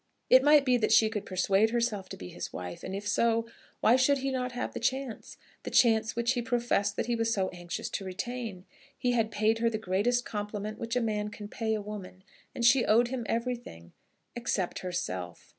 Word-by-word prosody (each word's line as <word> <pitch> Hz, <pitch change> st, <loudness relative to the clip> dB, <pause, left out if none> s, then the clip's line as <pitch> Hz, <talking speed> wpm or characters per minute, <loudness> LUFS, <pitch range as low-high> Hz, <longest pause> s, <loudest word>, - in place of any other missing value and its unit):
It 260 Hz, -, +9 dB
might 295 Hz, 0 st, +6 dB
be 250 Hz, -2 st, +4 dB
that 230 Hz, -, 0 dB
she 220 Hz, -, +6 dB
could 210 Hz, -2 st, -4 dB
persuade 195 Hz, +3 st, +2 dB
herself 225 Hz, -5 st, -1 dB
to -, -, -7 dB
be 90 Hz, -, -8 dB
his -, -, -6 dB
wife; 90 Hz, -1 st, -7 dB
and 190 Hz, -, -4 dB
if 205 Hz, +1 st, -5 dB
so, 230 Hz, +2 st, +2 dB, 0.4 s
why 235 Hz, +3 st, +5 dB
should 280 Hz, +2 st, +4 dB
he 270 Hz, 0 st, -2 dB
not 250 Hz, -1 st, -2 dB
have 245 Hz, -, -3 dB
the -, -, -4 dB
chance, 265 Hz, -3 st, -3 dB, 0.2 s
the -, -, -5 dB
chance 220 Hz, -2 st, +3 dB
which 235 Hz, +1 st, +1 dB
he 250 Hz, -1 st, 0 dB
professed 240 Hz, -4 st, 0 dB
that -, -, -1 dB
he 240 Hz, -, 0 dB
was 230 Hz, 0 st, 0 dB
so 190 Hz, -4 st, 0 dB
anxious 175 Hz, -1 st, -5 dB
to -, -, -3 dB
retain? 205 Hz, 0 st, -5 dB, 0.3 s
He 245 Hz, -, 0 dB
had 225 Hz, -3 st, +1 dB
paid 220 Hz, +1 st, +1 dB
her 230 Hz, 0 st, +3 dB
the 220 Hz, -, -2 dB
greatest 220 Hz, +5 st, 0 dB
compliment 210 Hz, 0 st, -4 dB
which 230 Hz, +1 st, -3 dB
a 250 Hz, -, +2 dB
man 210 Hz, -2 st, -1 dB
can 210 Hz, 0 st, -8 dB
pay 220 Hz, +1 st, -2 dB
a 210 Hz, -, -4 dB
woman, 195 Hz, -3 st, -8 dB, 0.3 s
and 235 Hz, -, 0 dB
she 245 Hz, +1 st, +6 dB
owed 235 Hz, +3 st, +4 dB
him 245 Hz, -3 st, -4 dB
everything, 235 Hz, -, -4 dB, 0.4 s
except 225 Hz, -6 st, -2 dB
herself. 95 Hz, -, -5 dB
225 Hz, 210 wpm, -29 LUFS, 200-240 Hz, 0.4 s, It